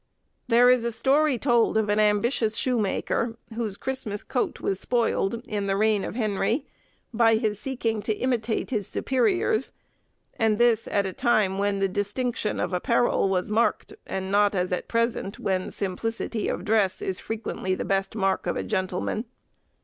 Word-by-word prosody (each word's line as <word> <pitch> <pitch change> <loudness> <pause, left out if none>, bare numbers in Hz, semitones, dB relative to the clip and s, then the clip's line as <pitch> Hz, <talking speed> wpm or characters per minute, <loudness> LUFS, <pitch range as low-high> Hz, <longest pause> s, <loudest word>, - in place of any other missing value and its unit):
There 245 +1 +5
is 250 -1 +5
a 235 - -1
story 275 +4 +2
told 235 -3 +2
of 220 -1 +1
an 205 +1 +1
ambitious 215 +2 +2
shoemaker, 230 -1 0 0.2
whose 220 -3 -3
Christmas 250 -6 -3
coat 250 - -2
was 195 -1 -1
spoiled, 235 -2 0
in 205 -2 -2
the 195 0 +1
reign 215 -1 +2
of - - -5
Henry, 225 +4 0 0.5
by 225 0 +4
his 215 -2 -1
seeking 230 -5 -2
to 215 - -1
imitate 245 -2 -1
his 210 -6 -1
superiors; 360 - +1 0.7
and 220 -2 +3
this 235 -1 +3
at 200 -1 +1
a 190 - -3
time 210 -6 +2
when 200 0 +1
the 195 0 +1
distinction 210 +4 -2
of - - -2
apparel 235 +2 +2
was 185 -1 0
marked, 225 +3 0
and 190 0 -3
not 205 0 +3
as 180 0 0
at 180 - -3
present, 230 -4 -1
when 185 -1 -1
simplicity 220 +3 -3
of - - -3
dress 210 -3 +1
is 190 - -3
frequently 215 -4 -3
the - - -4
best 195 +1 -1
mark 195 -3 0
of - - -1
a - - -2
gentleman. 190 +3 -2
220 Hz, 165 wpm, -25 LUFS, 195-235 Hz, 0.7 s, There